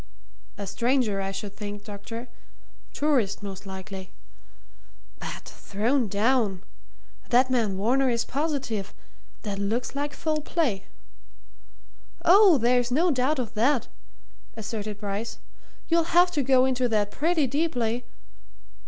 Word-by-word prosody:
"A 200 - -4
stranger, 230 0 +1
I 195 - -2
should 200 0 -6
think, 205 -1 -6
doctor 225 +4 -7 0.6
tourist, 260 -10 +1
most 195 0 -7
likely. 190 0 -7 1.1
But - - -6
thrown 230 +5 -1
down! 205 -2 +1 0.7
That 255 +2 +4
man 220 -6 +1
Varner 255 +6 +2
is 235 -1 0
positive. 270 -9 -2 0.5
That 200 -3 -3
looks 220 +5 -1
like 290 +1 -3
foul 310 -1 -1
play." 285 - -1 1.4
"Oh, 385 -2 +7
there's 245 0 +2
no 325 +8 +3
doubt 270 +3 +1
of 240 -4 -3
that!" 245 +3 +2 0.7
asserted 215 -1 -4
Bryce. 205 +2 -4 0.5
"You'll 335 0 +2
have 355 0 +6
to 295 - 0
go 260 -1 +4
into 255 -1 +1
that 210 -2 +1
pretty 320 0 +1
deeply. 250 -5 0
240 Hz, 120 wpm, -26 LUFS, 205-280 Hz, 1.4 s, Oh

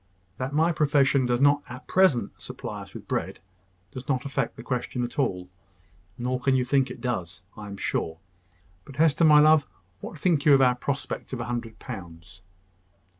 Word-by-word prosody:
That 130 +1 -3
my 160 +4 +2
profession 140 -4 +2
does 120 0 +1
not 145 +1 +5
at 125 +1 -9
present 165 - +2
supply - - -7
us - - -13
with - - -9
bread - - -3 0.5
does 130 +4 -9
not 130 -2 -1
affect 140 - -2
the - - -10
question 125 -1 -3
at 120 +4 -5
all: 90 -9 -1 0.7
nor 125 +1 -2
can 130 +1 +2
you 125 -1 +1
think 135 +1 +2
that - - -7
it - - -16
does, 90 -9 -4
I 105 -1 -9
am 100 -1 -8
sure. 80 -4 -2 0.7
But 140 - -13
Hester, 160 +2 +3
my 150 -1 +7
love, 155 0 +5 0.3
what - - -8
think 155 -2 +1
you 145 -2 +7
of 135 - +3
our 125 -1 +5
prospect 135 +2 -4
of 125 - -3
a 120 - -3
hundred 120 -2 -5
pounds?" 85 0 -10
130 Hz, 190 wpm, -26 LUFS, 120-145 Hz, 0.7 s, my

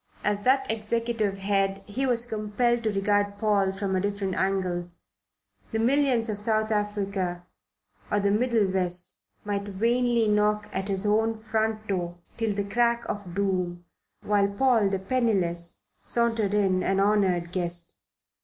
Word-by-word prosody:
As 210 -1 +1
that 265 +5 +3
executive 225 -1 -1
head 195 0 0
he 260 +6 -2
was 240 -1 +1
compelled 230 +2 0
to 220 -2 0
regard 205 0 +1
Paul 205 -3 +2
from 195 0 -2
a 185 - +1
different 200 -1 -2
angle. 185 -2 -1 0.8
The 225 - -1
millions 250 0 +2
of 210 -2 -3
South 215 +1 0
Africa 200 -4 -2 0.6
or 205 - +2
the 200 0 +2
Middle 230 0 +2
West 180 -1 -1 0.3
might 205 -1 -1
vainly 235 +3 +1
knock 210 0 +2
at 190 +1 -2
his 195 0 -1
own 220 +2 +2
front 220 0 -1
door 175 -3 -2 0.2
till 225 -3 -1
the 200 - -1
crack 235 +3 +1
of 195 -4 -5
doom, 180 -3 -1 0.4
while 205 -1 +2
Paul 220 0 +2
the 195 - 0
penniless 190 -6 0 0.3
sauntered 225 -4 +1
in 190 -3 +2
an 195 +1 +1
honoured 195 -4 +2
guest. 175 -1 0
205 Hz, 145 wpm, -26 LUFS, 190-225 Hz, 0.8 s, that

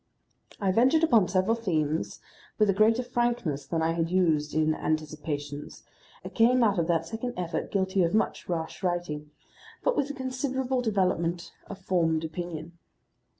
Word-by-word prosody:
I 195 -2 +1
ventured 260 - +4
upon 230 - +5
several 185 +5 +2
themes 160 -8 -1 0.4
with 215 - +4
a - - -1
greater 220 +5 +3
frankness 240 - -1
than 165 +1 -1
I 165 - +2
had 165 0 -1
used 160 -5 +1
in 155 0 +3
Anticipations, 150 -2 -4 0.4
and - - -8
came 245 +2 +4
out 205 -5 +3
of 165 - 0
that 165 -2 +1
second 230 +7 -5
effort 175 -1 -3
guilty 190 -1 +1
of 170 +2 +2
much 220 - -1
rash 165 0 -3
writing, 175 -5 -2 0.5
but - - +2
with 285 - 0
a 285 - -5
considerable 260 0 -2
development 180 -6 0 0.2
of 200 - -6
formed 165 -4 +1
opinion. 165 0 -6
180 Hz, 155 wpm, -28 LUFS, 160-230 Hz, 0.5 s, upon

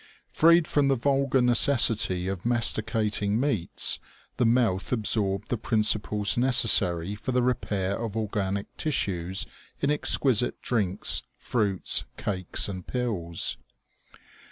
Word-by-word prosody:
Freed 170 0 +4
from 145 -2 +1
the 135 - +2
vulgar 135 +1 +1
neces 125 +3 +5 0.2
sity 95 -4 -1
of 95 -2 -4
masticating 110 -3 -1
meats, 125 - -1 0.4
the 120 - +2
mouth 115 -6 0
absorbed 105 -4 -1
the 120 - -2
princi 110 -1 +1
ples 105 +2 -1
necessary 100 -8 +4
for 105 +5 -5
the 125 0 +1
repair 100 -6 -2
of 115 -2 -5
organic 100 -2 -3
tissues 95 - -2 0.3
in 140 - 0
exquisite 130 -5 +2
drinks, 100 -5 -1 0.2
fruits, 105 -6 -1
cakes 95 -3 -1
and 95 -3 -7
pills. 100 -10 -2
110 Hz, 120 wpm, -26 LUFS, 95-125 Hz, 0.4 s, neces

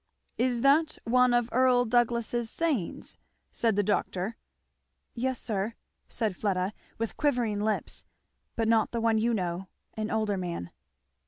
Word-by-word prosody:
"Is 245 -1 +1
that 305 +3 +4
one 250 +1 +4
of 240 -1 +3
Earl 250 0 +4
Douglass's 240 0 +1
sayings?" 290 - -2 0.3
said 225 -3 +1
the 205 - +2
doctor. 200 +1 -1 0.8
"Yes 255 +1 -1
sir," 215 +1 -2 0.3
said 220 -5 -1
Fleda 190 0 0 0.2
with 230 0 -3
quivering 245 -8 +1
lips, 215 0 -1 0.5
"but 225 -1 0
not 225 0 +3
the 235 - 0
one 225 -1 +2
you 235 +2 +2
know 185 -3 -2 0.3
an 215 0 -3
older 215 -3 0
man." 170 - -4
225 Hz, 140 wpm, -29 LUFS, 205-245 Hz, 0.8 s, that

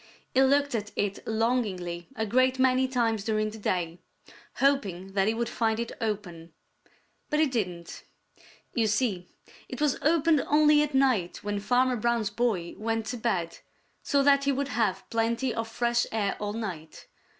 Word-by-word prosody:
He 260 - +4
looked 280 +1 +3
at 210 -2 -3
it 200 -1 -1
longingly 210 -7 -1
a 220 - -1
great 255 +4 +2
many 260 0 +3
times 230 -5 0
during 215 0 0
the 220 - -10
day, 175 -4 -2 0.6
hoping 195 -10 0
that 195 0 +2
he 220 - +1
would 235 +1 -1
find 225 -1 0
it 235 - -3
open. 180 -7 -4 0.8
But 300 - +1
he 315 - +5
didn't. 180 - -4 0.7
You 230 -3 +1
see, 210 -5 0 0.4
it - - -6
was 295 -3 +1
opened 315 -1 +3
only 300 0 +5
at 300 -2 -1
night 255 -10 +1
when 205 0 -2
Farmer 250 +4 +2
Brown's 230 -2 0
boy 205 -6 -1
went 225 0 -1
to - - -4
bed, 190 -8 -2 0.4
so 280 -1 +2
that 280 0 +4
he 280 - +3
would 280 +1 -2
have 220 -6 -1
plenty 230 +2 0
of 225 0 -3
fresh 235 +1 0
air 205 -3 0
all 205 0 -3
night. 180 -9 -6
225 Hz, 165 wpm, -27 LUFS, 200-260 Hz, 0.8 s, he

